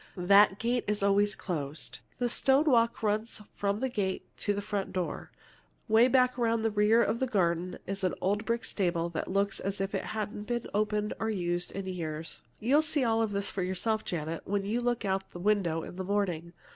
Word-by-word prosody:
That 200 Hz, +2 st, +5 dB
gate 240 Hz, +2 st, 0 dB
is 210 Hz, -1 st, 0 dB
always 200 Hz, +1 st, +3 dB
closed. 155 Hz, -5 st, -5 dB, 0.2 s
A 245 Hz, -, +1 dB
stone 270 Hz, +4 st, +3 dB
walk 235 Hz, -6 st, +3 dB
runs 215 Hz, +2 st, 0 dB, 0.2 s
from 200 Hz, 0 st, -1 dB
the 265 Hz, -, +1 dB
gate 200 Hz, -7 st, -3 dB
to 205 Hz, -, 0 dB
the 200 Hz, -, -1 dB
front 205 Hz, -1 st, -3 dB
door. 180 Hz, -2 st, -3 dB, 0.6 s
'Way 225 Hz, +2 st, +6 dB
back 255 Hz, -1 st, +3 dB
at 230 Hz, -1 st, +1 dB
the 225 Hz, -, +1 dB
rear 210 Hz, +3 st, +4 dB
of 225 Hz, +3 st, 0 dB
the 260 Hz, -, +1 dB
garden 180 Hz, -5 st, 0 dB
is 195 Hz, +1 st, -4 dB
an 185 Hz, -, +1 dB
old 205 Hz, +3 st, 0 dB
brick 230 Hz, +1 st, -1 dB
stable 170 Hz, -3 st, 0 dB
that 165 Hz, -2 st, -4 dB
looks 200 Hz, +1 st, 0 dB
as 195 Hz, 0 st, -3 dB
if 195 Hz, 0 st, -2 dB
it -, -, -2 dB
hadn't 210 Hz, -1 st, -4 dB
been 240 Hz, -1 st, -2 dB
opened 210 Hz, 0 st, 0 dB
or 220 Hz, -, -1 dB
used 175 Hz, -3 st, -1 dB
in 195 Hz, -1 st, -4 dB
years. 165 Hz, -4 st, -5 dB, 0.2 s
"You'll 270 Hz, +7 st, +4 dB
see 300 Hz, -3 st, +1 dB
all 225 Hz, -1 st, +2 dB
this 200 Hz, -1 st, -2 dB
yourself, 190 Hz, +4 st, -1 dB
Janet, 165 Hz, -1 st, -3 dB
when 200 Hz, 0 st, -1 dB
you 220 Hz, +4 st, 0 dB
look 240 Hz, -2 st, -1 dB
out 190 Hz, 0 st, 0 dB
of -, -, -34 dB
the 175 Hz, -, -7 dB
window 175 Hz, -5 st, +1 dB
in 180 Hz, -, -9 dB
the 190 Hz, -, -3 dB
morning. 180 Hz, -4 st, -1 dB
205 Hz, 205 wpm, -30 LUFS, 185-225 Hz, 0.6 s, Way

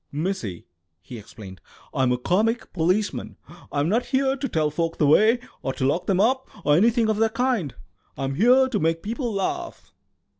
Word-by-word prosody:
"Missy," 145 Hz, -, -4 dB, 0.3 s
he 110 Hz, +7 st, -10 dB
explained, 95 Hz, -4 st, -12 dB, 0.3 s
"I'm 130 Hz, -2 st, +1 dB
a 125 Hz, -, +1 dB
comic 215 Hz, -, 0 dB
policeman. 185 Hz, +5 st, -1 dB, 0.3 s
I'm 145 Hz, +1 st, 0 dB
not 225 Hz, +7 st, 0 dB
here 270 Hz, 0 st, +1 dB
to 275 Hz, 0 st, -4 dB
tell 155 Hz, -4 st, 0 dB
folk 165 Hz, +2 st, -2 dB
the 150 Hz, -, +2 dB
way 215 Hz, -, +5 dB, 0.2 s
or 135 Hz, -, -3 dB
to 130 Hz, -, -2 dB
lock 145 Hz, +6 st, 0 dB
them 190 Hz, -2 st, +1 dB
up, 260 Hz, +5 st, +1 dB, 0.2 s
or 145 Hz, 0 st, +4 dB
anything 225 Hz, +5 st, +3 dB
of 215 Hz, -1 st, 0 dB
that 225 Hz, 0 st, +1 dB
kind; 230 Hz, -, 0 dB, 0.4 s
I'm 135 Hz, 0 st, -2 dB
here 250 Hz, -, +4 dB
to 240 Hz, -6 st, -1 dB
make 165 Hz, +1 st, 0 dB
people 235 Hz, +3 st, -3 dB
laugh." 335 Hz, -, -4 dB
190 Hz, 180 wpm, -24 LUFS, 145-235 Hz, 0.4 s, way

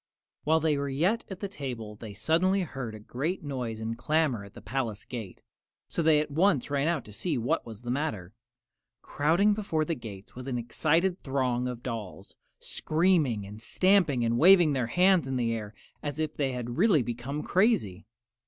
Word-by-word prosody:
While 160 Hz, +2 st, +4 dB
they 155 Hz, -2 st, +1 dB
were 140 Hz, 0 st, -2 dB
yet 175 Hz, +12 st, +1 dB
at 190 Hz, -2 st, -8 dB
the 200 Hz, -, -2 dB
table 125 Hz, -, -6 dB
they 105 Hz, -1 st, -9 dB
suddenly 185 Hz, -, +2 dB
heard 135 Hz, -9 st, -5 dB
a -, -, -9 dB
great 145 Hz, -, -3 dB
noise 125 Hz, -6 st, -4 dB
and 110 Hz, +1 st, -3 dB
clamor 150 Hz, -4 st, 0 dB
at 100 Hz, -, -14 dB
the -, -, -9 dB
palace 115 Hz, -2 st, -3 dB
gate, 110 Hz, -7 st, -7 dB, 0.4 s
so -, -, -2 dB
they 155 Hz, -2 st, +5 dB
at 150 Hz, -1 st, -2 dB
once 155 Hz, -3 st, +2 dB
ran 140 Hz, +1 st, +1 dB
out 165 Hz, -7 st, 0 dB
to 105 Hz, -, -12 dB
see 170 Hz, -, -2 dB
what 120 Hz, +1 st, -1 dB
was 110 Hz, 0 st, -9 dB
the 120 Hz, -, -3 dB
matter. 110 Hz, -, -3 dB, 0.7 s
Crowding 170 Hz, +8 st, +2 dB
before 180 Hz, -7 st, -1 dB
the 165 Hz, -, -1 dB
gates 105 Hz, -8 st, -9 dB
was 125 Hz, +1 st, -8 dB
an 125 Hz, -2 st, -2 dB
excited 165 Hz, +10 st, +1 dB
throng 130 Hz, -2 st, 0 dB
of 125 Hz, -1 st, -6 dB
dolls, 105 Hz, -5 st, -6 dB, 0.2 s
screaming 155 Hz, -, +1 dB
and 105 Hz, +2 st, -10 dB
stamping 170 Hz, -, +3 dB
and 115 Hz, +1 st, +1 dB
waving 175 Hz, -3 st, +7 dB
their 130 Hz, -4 st, 0 dB
hands 180 Hz, +2 st, +3 dB
in 135 Hz, -, -2 dB
the 115 Hz, -2 st, 0 dB
air 105 Hz, -2 st, -5 dB, 0.3 s
as 145 Hz, -1 st, -4 dB
if 155 Hz, -1 st, -2 dB
they 135 Hz, -3 st, 0 dB
had 120 Hz, +2 st, -4 dB
really 185 Hz, -, +4 dB
become 120 Hz, +6 st, -4 dB
crazy. 110 Hz, -, +1 dB
135 Hz, 190 wpm, -28 LUFS, 115-160 Hz, 0.7 s, waving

